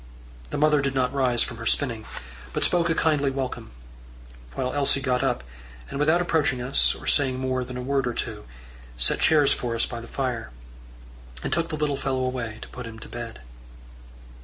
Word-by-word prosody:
The - - -3
mother 150 -1 +4
did 140 -1 -1
not 130 0 +1
rise 125 -4 +3
from 115 - -6
her 115 0 -5
spinning, 115 -6 0 0.5
but - - 0
spoke 175 -1 +2
a 165 - +2
kindly 150 -4 +2
welcome, 135 - -4 0.9
while 125 - -1
Elsie 140 -1 +3
got 130 -2 0
up, - - 0 0.5
and 140 - -4
without 155 +4 +4
approaching 155 -7 +1
us, 125 +2 +3
or - - -11
saying 130 -3 +3
more 130 -1 -1
than 125 0 -7
a 125 - -4
word 135 0 +1
or 120 - -2
two, - - -4 0.5
set - - +3
chairs 150 -3 +5
for 120 -2 -3
us 115 - +3
by 120 -1 -6
the 115 - -10
fire, 125 - -3 0.9
and - - -1
took 165 -1 0
the 155 - -3
little 150 -2 0
fellow 135 -1 -1
away 120 -4 -3
to - - -10
put 125 -2 -7
him 110 -1 -9
to 110 - -10
bed. 120 - -7
130 Hz, 195 wpm, -25 LUFS, 120-145 Hz, 0.9 s, chairs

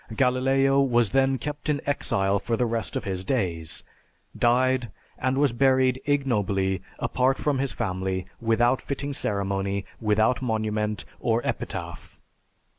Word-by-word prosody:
Galileo 135 +2 +3
was 120 -5 +2
then 135 0 +3
kept 145 +4 -5
in 145 -1 +1
exile 100 -8 +1
for 115 +2 -1
the 125 - +2
rest 115 -2 -3
of - - -2
his 95 -2 -3
days, 90 - -2 0.5
died, 125 0 +2 0.3
and 130 +1 0
was 140 -2 +3
buried 130 +1 +3
ignobly, 105 -9 +1 0.2
apart 130 +1 +1
from 145 -3 0
his 135 -2 -1
family, 95 -4 -2
without 120 +2 +2
fitting 140 +1 -4
ceremony, 100 -3 -1
without 110 +3 +2
monument 110 -3 -1
or 115 -1 +1
epitaph. - - -5
120 Hz, 130 wpm, -26 LUFS, 100-135 Hz, 0.5 s, Galileo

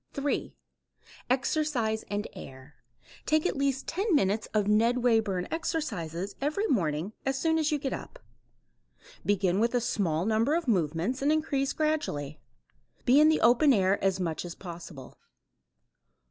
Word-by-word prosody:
3. 280 +1 -2 0.7
Exercise 255 -4 0
and 205 +1 -2
air. 130 +2 -11 0.5
Take 310 +1 +2
at - - 0
least 275 -1 -1
10 390 +1 0
minutes 205 -4 +1
of 210 -2 +1
Ned 230 +4 +2
Wayburn 215 -7 +1
exercises 200 - -3
every 305 +9 0
morning 175 - 0
as 270 0 -1
soon 320 +3 +1
as 310 0 +1
you 300 - +2
get 270 -2 -3
up. - - -8 1.1
Begin 195 -2 +1
with 235 +2 +1
a - - +4
small 180 -8 -1
number 225 +7 +2
of 335 -3 -2
movements 180 - 0
and 285 +2 +2
increase 285 -3 0
gradually. 225 - -2 0.7
Be 265 +2 +6
in 305 +1 +6
the 315 - +2
open 250 +5 +5
air 195 -2 +2
as 190 -1 +1
much 165 -3 -2
as 175 -1 -7
possible. 170 -6 -10
230 Hz, 145 wpm, -28 LUFS, 185-290 Hz, 1.1 s, Be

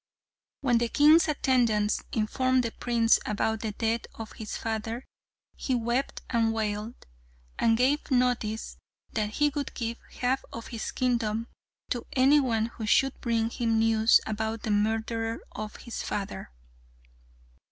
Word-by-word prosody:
When 245 -4 +3
the 235 0 0
king's 305 +6 +6
attendants 235 -8 +2
informed 255 +4 +1
the 230 - -2
prince 230 -1 +2
about 220 +1 -1
the 220 0 -3
death 225 +2 0
of 225 0 -7
his 220 -2 -6
father 225 +2 -3 0.5
he 260 - -1
wept 240 +3 -1
and 230 -2 +2
wailed, 215 +1 -2 0.6
and 225 -1 +3
gave 270 +5 +1
notice 245 -4 0 0.4
that 215 -1 0
he 295 +7 +2
would 285 -1 -4
give 230 0 -3 0.2
half 255 +1 +1
of 230 - -8
his 230 -2 -4
kingdom 230 -3 0 0.4
to 240 -1 -2
any 275 +3 +5
one 230 -5 +1
who 225 -1 -6
should 270 +5 +2
bring 230 -1 0
him 230 -2 0
news 225 0 +5
about 220 +1 -3
the 220 - -1
murderer 225 +2 0
of 215 0 -6
his 235 - -6
father. 195 - -4
230 Hz, 140 wpm, -28 LUFS, 220-250 Hz, 0.6 s, king's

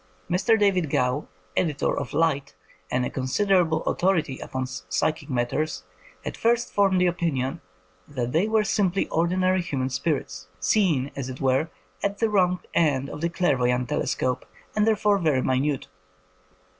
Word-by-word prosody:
Mr. 200 +6 +3
David 190 -6 +2
Gow, 125 +2 0 0.3
editor 150 -5 +1
of - - -4
Light, 145 - 0 0.3
and 125 0 0
a - - -2
considerable 160 +4 +1
authority 170 -8 0
upon 130 0 -4
psychic 130 +4 -2
matters, 125 -2 -1 0.4
had - - -4
first 235 +1 +1
f - - -26
oniied 195 -2 +4
the 180 - +3
opinion 160 -7 -1 0.5
that 125 -4 -3
they 170 +8 +2
were 220 -1 +3
simply 195 -3 +1
ordinary 185 +3 +2
human 135 -6 -2
spirits, 130 - -2
seen, 160 -11 +2
as 135 -2 -4
it 130 - -7
were, 135 +4 +1 0.3
at 200 0 -1
the 225 0 +1
wrong 180 -3 +2
end 140 -4 +2
of 150 - -7
a 170 - +2
clairvoyant 125 -8 +1
telescope, 130 -1 -1 0.3
and 210 0 +2
therefore 210 -2 +3
very 150 -7 +2
minute. 135 +2 0
155 Hz, 150 wpm, -25 LUFS, 130-185 Hz, 0.5 s, oniied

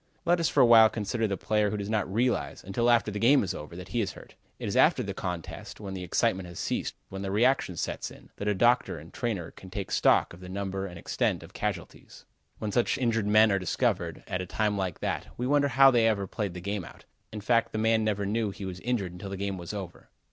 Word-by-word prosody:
Let 175 +1 +3
us 165 - +2
for - - +3
a - - +8
while 115 -2 +8
consider 110 +1 -1
the 100 -2 -2
player 105 +2 +1
who 105 - -3
does 100 -1 -4
not 105 -3 -1
realize, 120 +4 0
until 115 +6 0
after 115 -3 +3
the 105 - -4
game 130 +4 +5
is 95 - -2
over, 75 +3 -8
that 90 +1 -9
he 120 - 0
is 100 -2 -2
hurt. - - -14 0.2
It - - -5
is - - -2
after - - +4
the - - -4
contest, 90 -3 -6
when 100 -2 -6
the 95 -1 -5
excitement 95 +1 0
has 85 - -10
ceased, - - -2
when 95 0 -6
reaction 100 -1 +1
sets - - -3
in, - - -16
that 100 - -4
a 105 - +2
doctor 120 -3 +3
and 80 +2 -12
trainer 105 -9 -3
can 95 - -13
take 95 0 -5
stock - - +3
of 85 - -12
the 90 0 -10
number 95 0 -3
and 90 -2 -9
extent - - -1
of - - -14
casualties. - - -5 0.3
When 105 - -3
such 120 +5 +1
injured 115 -5 0
men 110 +1 +6
are 100 - +2
discovered, 95 - -1
at 90 - -3
a 90 - -6
time 105 +2 0
like 95 -4 -3
that, - - -2
we 125 - -2
wonder 145 +1 +3
how 135 0 +6
they 115 -2 +4
ever 100 -3 +1
played 95 -1 -4
the 90 - -6
game 100 +1 -3
out. - - -13 0.3
In 105 - -5
fact 115 +2 +2
the - - -3
man 110 0 +2
never 105 -2 0
knew 110 +1 0
he 100 0 -7
was 90 -1 -6
injured 110 -6 -1
until 90 +3 -8
the 95 - -5
game 100 -1 -3
was 85 - -6
over. 95 -4 -8
105 Hz, 250 wpm, -28 LUFS, 95-115 Hz, 0.3 s, a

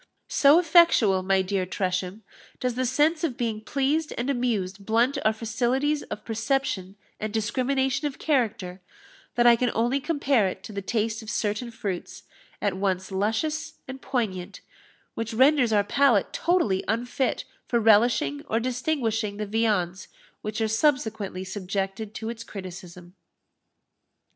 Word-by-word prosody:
_ - - -30 0.2
So 285 +2 +5
effectual, 330 - +5
my 190 0 +2
dear 190 0 -1
Tresham, 185 +2 -2 0.4
does 250 -1 -1
the 255 +1 -1
sense 305 +6 +2
of 280 -8 -1
being 225 -3 -2
pleased 285 +6 0
and 250 +4 0
amused 205 -7 -2
blunt 235 +7 +2
our 215 - +4
faculties 245 +7 0
of - - -6
perception 225 -4 -1 0.2
and 215 0 -3
discrimination 265 +5 0
of 280 - -7
character, 225 - -1 0.5
that 240 - +3
I 240 -1 +8
can 245 +1 0
only 240 +5 +1
compare 280 - +1
it 190 0 -6
to 215 - -9
the 200 - -3
taste 220 +2 -1
of 220 - -9
certain 215 +2 -2
fruits, 200 -6 -5 0.4
at 205 - +1
once 190 -1 -1
luscious 260 +12 -1
and 265 0 -8
poignant, 205 -7 -3 0.5
which 225 0 -4
renders 260 -1 +4
our 205 -1 +4
palate 240 -1 +2
totally 315 - +1
unfit 245 +4 -1 0.2
for 235 - +1
relishing 240 +7 +3
or 225 - +1
distinguishing 235 -4 -1
the 210 - -3
viands 200 -4 0 0.3
which 215 +1 -4
are 220 - +2
subsequently 220 -6 0
subjected 195 +2 -4
to 220 - -4
its 230 -1 -6
criticism. 180 -3 -9
225 Hz, 145 wpm, -26 LUFS, 200-260 Hz, 0.5 s, I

